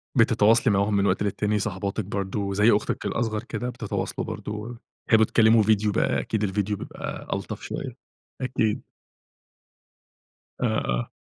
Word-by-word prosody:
بتتواصلي 115 -2 +4
معاهم 100 +2 +2
من 100 - +2
وقت 100 - +1
للتاني 105 +1 0
صاحباتك 100 +1 -3
برضه، 100 0 -2
زي 105 +4 +5
أختك 105 - 0
الأصغر 110 -2 -1
كده، 125 0 -4
بتتواصلوا 120 -4 -3
برضه 110 +3 -5 0.3
بتحبوا 110 -1 +5
تكلموا 110 0 +5
فيديو 105 0 +2
بقى - - +1
أكيد 110 -1 -2
الفيديو 100 +1 -1
بيبقى - - -7
ألطف - - -5
شوية، - - -5 0.5
أكيد. 120 -4 0 1.8
آه، - - +2
آه. - - -2
105 Hz, 135 wpm, -25 LUFS, 100-110 Hz, 1.8 s, زي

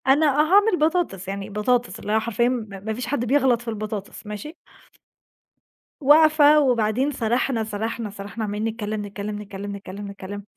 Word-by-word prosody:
أنا 285 +4 +5
آه 295 0 +3
هاعمل 395 +3 +4
بطاطس، 310 - 0
يعني 195 0 -5
بطاطس 210 0 0
اللي 210 - -5
هي 220 - +4
حرفيًا 235 +2 +1
م 240 -4 -2
ما 200 +2 -5
فيش 245 +2 -5
حد 245 -2 -1
بيغلط 260 -2 +3
في 240 - -15
البطاطس، 215 -2 -5
ماشي؟ 210 +10 -7 1.4
واقفة، 300 +1 +6
وبعدين 250 0 +2
سرحنا، 240 -1 0
سرحنا، 220 +1 -4
سرحنا، 205 +2 -7
عمّالين 210 +1 -2
نتكلم، 215 -2 -4
نتكلم، 205 +1 -5
نتكلم، 200 0 -7
نتكلم، 200 0 -8
نتكلم، 200 0 -8
220 Hz, 160 wpm, -23 LUFS, 205-265 Hz, 1.4 s, واقفة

